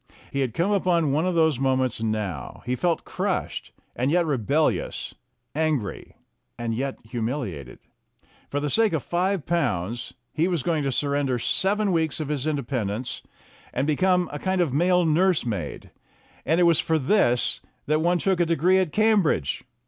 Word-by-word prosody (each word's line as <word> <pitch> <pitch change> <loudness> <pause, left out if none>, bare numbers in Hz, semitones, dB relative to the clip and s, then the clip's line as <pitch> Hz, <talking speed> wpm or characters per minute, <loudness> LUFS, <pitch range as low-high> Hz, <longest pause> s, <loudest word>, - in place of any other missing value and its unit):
He 140 - -2
had 130 -4 -1
come 180 +5 +1
upon 175 -6 +2
one 155 +6 +1
of 180 - 0
those 160 -5 +3
moments 130 -3 +1
now; 105 - -3
he 125 +1 0
felt 170 +4 0
crushed, - - -3 0.2
and 125 +3 0
yet 170 +2 +3
re 145 -4 0
bellious; 145 +8 0 0.4
angry, 150 -9 -2 0.4
and 115 -1 -2
yet 135 +4 -2
humiliated. 110 - -4 0.7
For 145 - -1
the 145 -1 -2
sake 225 -4 +3
of 155 - -1
five 180 0 0
pounds 120 - -1 0.2
he 160 +3 +1
was 175 -7 -1
going 160 -1 +1
to 135 - +1
surrender 140 -1 0
seven 200 - +1
weeks 160 -3 0
of 155 -2 -3
his 150 -1 -1
independence, 125 -6 -2 0.5
and 130 - +1
become 180 +4 +2
a 145 - -4
kind 190 +2 0
of 165 -7 +1
male 180 +4 +3
nurse 170 0 +3
maid. 105 -7 -4 0.6
And 160 +4 +3
it - - +5
was 170 -2 +5
for 160 - +1
this 135 - +2 0.2
that 155 +1 +1
one 175 +2 +3
took 190 0 +1
a 175 - +4
degree 170 +3 +3
at 185 -5 0
Cambridge! 210 - +2
150 Hz, 170 wpm, -25 LUFS, 125-175 Hz, 0.7 s, it